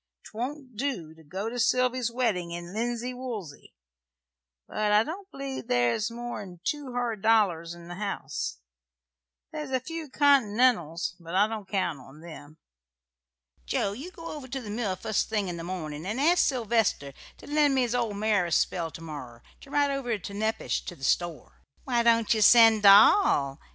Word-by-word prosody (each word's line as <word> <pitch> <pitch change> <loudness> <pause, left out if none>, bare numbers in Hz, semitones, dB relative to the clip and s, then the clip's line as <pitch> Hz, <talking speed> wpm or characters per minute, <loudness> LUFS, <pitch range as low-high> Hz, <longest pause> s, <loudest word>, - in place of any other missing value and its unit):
'Twon't 255 +2 -6
do 210 - -3
to 160 0 -18
go 190 +8 -5
to 245 +2 -4
Sylvy's 250 0 +2
weddin' 225 -8 -1
in 175 +1 -7
linsey 240 +2 -2
woolsy; 225 - -8 0.9
but 210 -1 -1
I 210 +1 +5
don't 375 - -7
believe 275 -3 -6
there's 120 - +1
more'n 230 -6 -7
two 285 0 -3
hard 240 -4 -2
dollars 185 -7 +2
in 170 0 -13
the 175 - -7
house. 200 - -4 0.9
There's 300 -2 -5
a 260 -1 0
few 320 +3 -7
Continentals; 235 - +2
but 170 +1 -7
I 200 +2 +5
don't 215 -3 -6
count 185 -7 -1
on 135 +4 -15
them. 155 -2 -12 1.1
Joe, 195 - 0
you 270 - -7
go 335 -2 -12
over 290 -4 -8
to 265 +1 -4
the 215 -5 -7
mill 210 -4 -2
fust 215 +3 -1
thing 210 -3 -1
in 175 - -5
the 165 - -6
morning 160 -4 -5
and 215 +6 -2
ask 335 +5 +4
Sylvester 225 - 0 0.2
to - - -14
lend 295 -2 +2
me 260 - +3
his 245 -1 0
old 230 -5 -1
mare 205 -4 +1
a - - -7
spell 165 0 +1
to 165 - -11
morrer, 135 -7 -9 0.2
to - - -15
ride 285 0 +2
over 250 -5 -2
to 200 +1 -8
Nepash, 220 +2 -1
to 175 - -6
the 135 - -16
store." 170 +3 -1 0.2
"Why 240 -3 +1
don't 230 -1 +3
ye 220 - 0
send 225 0 +7
Doll?" 200 - +6
220 Hz, 175 wpm, -27 LUFS, 175-255 Hz, 1.1 s, send